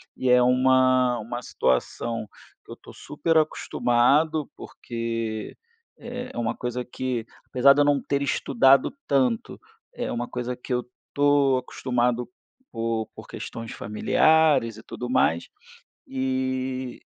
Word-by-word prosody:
e 130 - -1
é 125 0 +6
uma 130 0 +3
uma 120 +3 -5
situação 110 - -1 0.4
que - - -15
eu - - -7
tô - - -15
super 165 -1 -1
acostumado, 150 +1 +2
porque, 115 -2 -5 0.4
eh, 245 +2 -7
é - - -11
uma 115 0 -1
coisa 125 0 -4
que, 125 -2 -3 0.2
apesar 135 +2 +5
de 145 - +2
eu - - +4
não 145 -1 +3
ter 140 0 -2
estudado 135 - +3
tanto, 130 -5 0 0.4
é - - -3
uma 120 0 -3
coisa 125 0 -4
que 125 - -11
eu 125 -1 0 0.3
tô 145 -2 +3
acostumado, 125 -1 -1 0.4
por 115 -1 -2
por - - -10
questões 115 0 -7
familiares 130 +2 +2
e 110 - -12
tudo 125 0 -7
mais, 85 -10 +1 0.6
e 130 -1 -2
125 Hz, 135 wpm, -25 LUFS, 120-135 Hz, 0.6 s, é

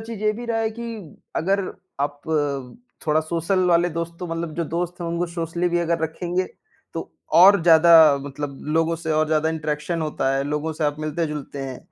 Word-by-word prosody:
चीज़ 225 -2 -7
ये 215 0 +3
भी 235 +3 -7
रहा 230 -1 0
है 220 0 0
कि 235 +2 -7 0.5
अगर 195 +4 +1 0.4
आप 145 0 -2 0.9
थोड़ा 155 +1 +3
सोशल 170 +4 -1
वाले 175 0 +4
दोस्त 170 +1 -4
तो 180 - -5
मतलब 165 -1 -4
जो 170 - -1
दोस्त 175 +3 -3
हैं 170 - -3
उनको 170 +1 -1
सोशली 170 +1 -2
भी 175 0 +1
अगर 170 0 0
रखेंगे, 175 +3 -1 0.5
तो - - -6 0.2
और 190 +2 +8
ज़्यादा 160 -3 +7
मतलब 140 0 -6 0.2
लोगों 165 0 +2
से 160 -1 -3
और 155 0 +2
ज़्यादा 155 0 +1
इंटरेक्शन 155 +1 -2
होता 135 -3 0
है, 135 - +1
लोगों 150 +2 -2
से 155 0 -3
आप 145 0 0
मिलते-जुलते 150 -2 -3
हैं। 130 -2 -6
165 Hz, 190 wpm, -23 LUFS, 155-175 Hz, 0.9 s, और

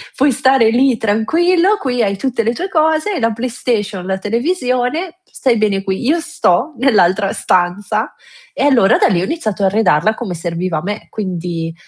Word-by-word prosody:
puoi 275 +1 +3
stare 260 -2 +3
lì 250 +1 +2
tranquillo, 335 - +2
qui 250 - -1
hai 200 -1 0
tutte 245 +2 -1
le 230 +2 0
tue 365 +9 -4
cose, 315 +1 +1
hai 370 - -2
la 230 -1 0
PlayStation, 225 -5 -3
la 190 0 -2
televisione, 255 - -2
stai 255 -9 0
bene 205 -2 0
qui. 195 +4 -3
Io 325 +4 +2
sto 320 - 0
nell'altra 205 -6 +2
stanza;" 180 +3 -1 0.4
e - - -2
allora 245 -9 +4
da - - +3
lì, 175 -5 +1
ho - - -1
iniziato 215 - -3
a - - +4
arredarla 205 -1 +2
come 220 -7 -5
serviva 170 0 -3
a - - -7
me, 205 +3 -5
quindi 175 -5 -4
225 Hz, 175 wpm, -16 LUFS, 195-275 Hz, 0.4 s, allora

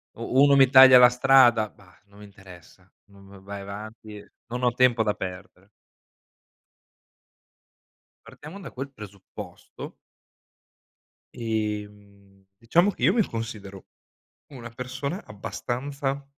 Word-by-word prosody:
u 125 +4 0
uno 140 -1 +5
mi 135 -2 +5
taglia 130 -1 +9
la 125 0 +8
strada, 125 -3 +4
bah, 95 -4 -23
non 100 0 -22
mi 105 - -12
interessa, 95 -2 -17 0.2
non 100 0 -18
v 100 0 -15
vai 100 0 -8
avanti, 105 +1 -10 0.2
non 125 +1 -6
ho 125 -1 +2
tempo 125 -2 +2
da 105 -1 0
perdere. 90 +1 -9 2.6
Partiamo 160 +7 -12
da 185 - -10
quel 135 +2 -7
presupposto 100 -5 -11 1.4
e, 110 -2 -3
mhmm, 100 -1 -23
diciamo 170 - +2
che - - -12
io - - +4
mi 225 -3 +2
considero 105 -4 -8 0.6
una 125 -5 -11
persona 130 - -6
abbastanza 135 +6 -5
115 Hz, 120 wpm, -24 LUFS, 100-130 Hz, 2.6 s, taglia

